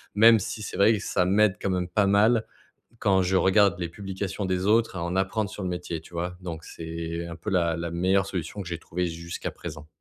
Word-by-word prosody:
même 115 Hz, +2 st, +7 dB
si 110 Hz, +2 st, -5 dB
c'est -, -, -6 dB
vrai 110 Hz, +3 st, +6 dB
que 105 Hz, -, -1 dB
ça 90 Hz, -, +1 dB
m'aide 100 Hz, +1 st, +3 dB
quand 95 Hz, -, 0 dB
même 90 Hz, -1 st, -1 dB
pas 100 Hz, +3 st, +2 dB
mal 110 Hz, +3 st, +4 dB, 0.5 s
quand 95 Hz, -2 st, +3 dB
je 95 Hz, +1 st, +1 dB
regarde 95 Hz, 0 st, +4 dB
les 85 Hz, -2 st, -2 dB
publications 95 Hz, +2 st, -5 dB
des 95 Hz, 0 st, -1 dB
autres 110 Hz, -2 st, +3 dB
à 85 Hz, -, -3 dB
en 85 Hz, +2 st, -2 dB
apprendre 95 Hz, +2 st, 0 dB
sur 100 Hz, -, -7 dB
le 90 Hz, -, -2 dB
métier, 90 Hz, -2 st, -4 dB
tu 85 Hz, -, -17 dB
vois? 90 Hz, +1 st, -3 dB
Donc 85 Hz, -2 st, -6 dB
c'est 85 Hz, +1 st, -5 dB
un 85 Hz, -, -7 dB
peu 90 Hz, -, -9 dB
la 85 Hz, -3 st, +2 dB
la 85 Hz, 0 st, -4 dB
meilleure 95 Hz, +3 st, +2 dB
solution 95 Hz, +2 st, -4 dB
que 90 Hz, -, -6 dB
j'ai 85 Hz, -, -4 dB
trouvée 90 Hz, +1 st, -3 dB
jusqu'à 85 Hz, 0 st, -5 dB
présent. 75 Hz, -3 st, -9 dB
90 Hz, 235 wpm, -26 LUFS, 85-100 Hz, 0.5 s, même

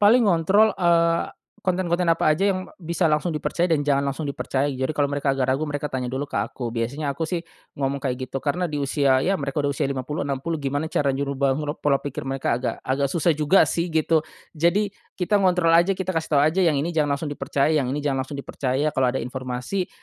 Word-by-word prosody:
Paling 220 Hz, +3 st, +5 dB
ngontrol 195 Hz, +5 st, +4 dB
eee, 170 Hz, -2 st, +2 dB, 0.3 s
konten-konten 180 Hz, -1 st, +1 dB
apa 165 Hz, -, +1 dB
aja 195 Hz, +6 st, +3 dB
yang 185 Hz, 0 st, -5 dB
bisa 170 Hz, -1 st, 0 dB
langsung 155 Hz, +3 st, +1 dB
dipercaya 170 Hz, +3 st, -1 dB
dan 155 Hz, -, +3 dB
jangan 140 Hz, -1 st, +1 dB
langsung 140 Hz, +2 st, -3 dB
dipercaya. 140 Hz, 0 st, -1 dB
Jadi, 130 Hz, +2 st, -2 dB
kalau 145 Hz, -1 st, +1 dB
mereka 140 Hz, -1 st, 0 dB
agak 130 Hz, -1 st, -1 dB
ragu 135 Hz, +4 st, +1 dB
mereka 145 Hz, 0 st, -3 dB
tanya 125 Hz, -2 st, -3 dB
dulu 140 Hz, +2 st, -3 dB
ke -, -, -5 dB
aku. 120 Hz, -3 st, -3 dB
Biasanya 140 Hz, +5 st, -2 dB
aku 165 Hz, -, -1 dB
sih 170 Hz, +1 st, -2 dB, 0.4 s
ngomong 140 Hz, 0 st, 0 dB
kayak 130 Hz, -2 st, -3 dB
gitu. -, -, -5 dB
Karena 175 Hz, +4 st, 0 dB
di 150 Hz, -, -4 dB
usia 140 Hz, -1 st, +2 dB
ya 190 Hz, -, +2 dB
mereka 140 Hz, +1 st, -2 dB
udah 140 Hz, -, +1 dB
usia 135 Hz, -, -1 dB
50 140 Hz, +5 st, -3 dB
60 150 Hz, +4 st, -2 dB
gimana 145 Hz, +3 st, -2 dB
cara 145 Hz, -, +1 dB
nyuruh 140 Hz, +1 st, -2 dB
bangkrut 145 Hz, +2 st, 0 dB
pola 140 Hz, -2 st, +3 dB
pikir 140 Hz, -1 st, -5 dB
mereka 135 Hz, 0 st, -1 dB
agak 130 Hz, -, -2 dB
agak 135 Hz, +2 st, 0 dB
susah 165 Hz, +3 st, +2 dB
juga 155 Hz, +5 st, +4 dB
sih 170 Hz, +1 st, -1 dB
gitu. 160 Hz, 0 st, +2 dB, 0.3 s
Jadi, 190 Hz, +6 st, +1 dB, 0.2 s
kita 200 Hz, +3 st, +1 dB
ngontrol 180 Hz, -3 st, +3 dB
aja 175 Hz, +3 st, +4 dB
kita 185 Hz, 0 st, -2 dB
kasih 165 Hz, -1 st, -2 dB
tahu 140 Hz, -, +5 dB
aja 160 Hz, +5 st, +2 dB
yang 165 Hz, -5 st, +3 dB
ini 160 Hz, +5 st, -1 dB
jangan 150 Hz, -3 st, +1 dB
langsung 145 Hz, +1 st, -5 dB
dipercaya, 140 Hz, +1 st, 0 dB
yang 145 Hz, -5 st, +1 dB
ini 145 Hz, +3 st, -3 dB
jangan 135 Hz, -2 st, 0 dB
langsung 140 Hz, +2 st, -7 dB
dipercaya, 140 Hz, +1 st, -1 dB
kalau 130 Hz, -1 st, +2 dB
ada 135 Hz, -, -2 dB
informasi 130 Hz, +8 st, -3 dB
150 Hz, 220 wpm, -23 LUFS, 140-170 Hz, 0.4 s, Paling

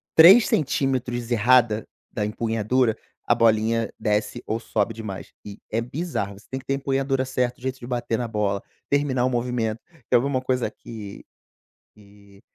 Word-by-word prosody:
3cm 135 Hz, -, +4 dB
errada 115 Hz, -1 st, +3 dB, 0.2 s
da 105 Hz, -, -2 dB
empunhadura, 115 Hz, +2 st, 0 dB, 0.3 s
a 120 Hz, -, +4 dB
bolinha 115 Hz, -1 st, +2 dB
desce 105 Hz, 0 st, -1 dB
ou 110 Hz, +1 st, -2 dB
sobe 105 Hz, -2 st, -1 dB
demais, 105 Hz, -3 st, -7 dB
e 100 Hz, 0 st, -8 dB
é 115 Hz, +2 st, 0 dB
bizarro. 125 Hz, -, -3 dB
Você -, -, -22 dB
tem 130 Hz, -, -4 dB
que 135 Hz, -, -16 dB
ter 135 Hz, -, 0 dB
empunhadura 135 Hz, -1 st, 0 dB
certo, 125 Hz, -1 st, -1 dB
o -, -, -23 dB
jeito 130 Hz, 0 st, -3 dB
de 120 Hz, -, -9 dB
bater 120 Hz, -2 st, -1 dB
na 120 Hz, -, -2 dB
bola, 105 Hz, -3 st, -1 dB, 0.3 s
terminar 140 Hz, -3 st, +1 dB
o -, -, +2 dB
movimento. 120 Hz, -2 st, -1 dB, 0.3 s
Quer -, -, +6 dB
ver 125 Hz, -, -2 dB
uma 135 Hz, -2 st, 0 dB
coisa 130 Hz, -1 st, -1 dB
que 105 Hz, -4 st, -10 dB, 0.7 s
que 100 Hz, -1 st, -19 dB
120 Hz, 165 wpm, -24 LUFS, 110-130 Hz, 0.7 s, Quer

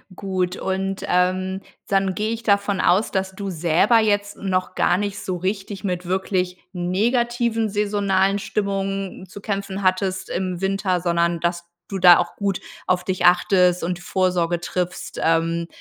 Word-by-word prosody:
gut. 185 Hz, -2 st, -2 dB
Und, 195 Hz, 0 st, -2 dB
ähm, 185 Hz, +1 st, +1 dB, 0.3 s
dann 195 Hz, -1 st, +1 dB
gehe 215 Hz, +1 st, -1 dB
ich 230 Hz, -, -4 dB
davon 200 Hz, -2 st, +2 dB
aus, 195 Hz, +5 st, +3 dB
dass 190 Hz, 0 st, -2 dB
du 200 Hz, -1 st, -4 dB
selber 175 Hz, +7 st, +3 dB
jetzt 205 Hz, -1 st, 0 dB
noch 185 Hz, -2 st, -1 dB
gar 175 Hz, -, +3 dB
nicht 205 Hz, 0 st, -3 dB
so 185 Hz, -, -3 dB
richtig 195 Hz, +2 st, -3 dB
mit 180 Hz, -2 st, -2 dB
wirklich 185 Hz, 0 st, -1 dB, 0.2 s
negativen 230 Hz, +5 st, 0 dB
saisonalen 200 Hz, -1 st, +1 dB
Stimmungen 195 Hz, -1 st, -3 dB
zu 200 Hz, +3 st, -11 dB
kämpfen 200 Hz, -1 st, -3 dB
hattest 185 Hz, 0 st, 0 dB
im 180 Hz, -1 st, -2 dB
Winter, 195 Hz, -2 st, 0 dB
sondern 170 Hz, 0 st, +1 dB
dass 170 Hz, 0 st, -2 dB, 0.2 s
du 195 Hz, -1 st, -3 dB
da 175 Hz, -1 st, +8 dB
auch 175 Hz, -1 st, -2 dB
gut 200 Hz, -3 st, -1 dB, 0.3 s
auf 180 Hz, -1 st, 0 dB
dich 185 Hz, -1 st, -1 dB
achtest 180 Hz, 0 st, +4 dB
und 175 Hz, +1 st, -2 dB
Vorsorge 175 Hz, -1 st, 0 dB
triffst, 180 Hz, 0 st, -4 dB
ähm, 165 Hz, +1 st, +1 dB
190 Hz, 150 wpm, -22 LUFS, 180-200 Hz, 0.3 s, da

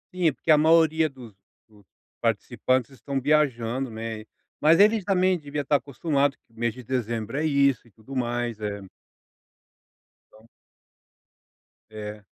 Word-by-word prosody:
Sim, 175 Hz, -3 st, +2 dB
porque 145 Hz, -, -1 dB
a 155 Hz, -, +7 dB
maioria 160 Hz, 0 st, +4 dB
dos 125 Hz, -6 st, -13 dB, 0.3 s
dos 105 Hz, -3 st, -23 dB, 0.3 s
participantes 130 Hz, 0 st, 0 dB
estão 135 Hz, +1 st, -4 dB
viajando, 130 Hz, -3 st, +1 dB
né, 110 Hz, -1 st, -6 dB, 0.4 s
mas 160 Hz, +4 st, +5 dB
eles 210 Hz, +1 st, +5 dB
também 185 Hz, -1 st, +2 dB
devia 145 Hz, -1 st, -4 dB
estar 145 Hz, +1 st, +2 dB
acostumado 140 Hz, +1 st, -1 dB
que -, -, -34 dB
o -, -, -25 dB
mês 120 Hz, 0 st, +1 dB
de 125 Hz, -, -10 dB
dezembro 115 Hz, -2 st, -3 dB
é 150 Hz, -, -1 dB
isso 140 Hz, -5 st, +2 dB
e -, -, -22 dB
tudo 110 Hz, +6 st, -12 dB
mais, 120 Hz, -2 st, -2 dB
eh 100 Hz, -1 st, -4 dB, 1.5 s
Então. 110 Hz, +1 st, -20 dB, 1.4 s
É. 105 Hz, -1 st, -8 dB
135 Hz, 140 wpm, -25 LUFS, 115-150 Hz, 1.5 s, a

